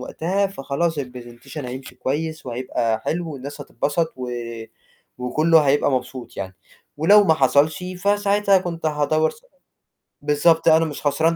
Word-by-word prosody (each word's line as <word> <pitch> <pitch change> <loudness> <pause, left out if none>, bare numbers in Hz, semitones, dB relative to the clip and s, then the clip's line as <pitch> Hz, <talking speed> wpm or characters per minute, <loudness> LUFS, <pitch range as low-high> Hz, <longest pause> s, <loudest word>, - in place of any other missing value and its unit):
وقتها 185 +9 -1
فخلاص 160 -1 -2
الPresentation 125 +1 -8
هيمشي 130 +1 -7
كويس 150 +4 -3
وهيبقى 115 -2 -1
حلو 170 -1 -2
والناس 140 +1 -8
هتبسط 155 +3 -1
و 125 -1 -5 0.9
وكلّه 155 +6 +3
هيبقى 145 0 +2
مبسوط 130 0 -4
يعني، 95 -1 -6 0.4
ولو 200 +7 +6
ما 160 - +4
حصلش، 145 +4 +2
فساعتها 200 0 +3
كنت 170 -3 -4
هادوّر 155 +1 +1
سأ - - -18 0.8
بالضبط، 150 +3 +3
أنا 160 0 +6
مش 150 -3 -6
خسران 160 +4 +2
150 Hz, 130 wpm, -22 LUFS, 130-165 Hz, 0.9 s, ولو